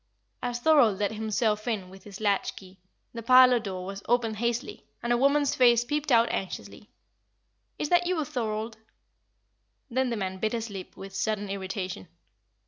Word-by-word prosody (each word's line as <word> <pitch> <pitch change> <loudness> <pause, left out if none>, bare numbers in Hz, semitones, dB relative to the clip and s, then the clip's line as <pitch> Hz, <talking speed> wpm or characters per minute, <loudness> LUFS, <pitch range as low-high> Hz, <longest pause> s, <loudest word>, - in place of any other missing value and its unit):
As 245 -1 -3
Thorold 245 -8 +4
let 205 +1 0
himself 215 0 -1
in 200 -6 -2
with 190 0 -14
his 200 -1 -10
latch 205 -2 0
key, 190 -1 -14 0.3
the 230 - -6
parlour 255 +1 +7
door 190 -4 -5
was 195 +1 -6
opened 230 -3 +1
hastily, 235 +2 -2 0.2
and 240 0 +1
a - - +3
woman's 280 +2 +3
face 240 -2 +4
peeped 295 +2 -2
out 230 -1 +5
anxiously. 190 - -6 0.9
"Is 295 - -3
that 350 0 +3
you, 340 -5 0
Thorold?" 220 -3 -3 1.1
Then 260 +1 +1
the 235 - -2
man 190 -2 -4
bit 220 +3 -1
his 230 -2 -3
lip 195 -2 -9
with 195 0 -9
sudden 205 +1 -2
irritation. 190 - -5
225 Hz, 165 wpm, -27 LUFS, 195-245 Hz, 1.1 s, parlour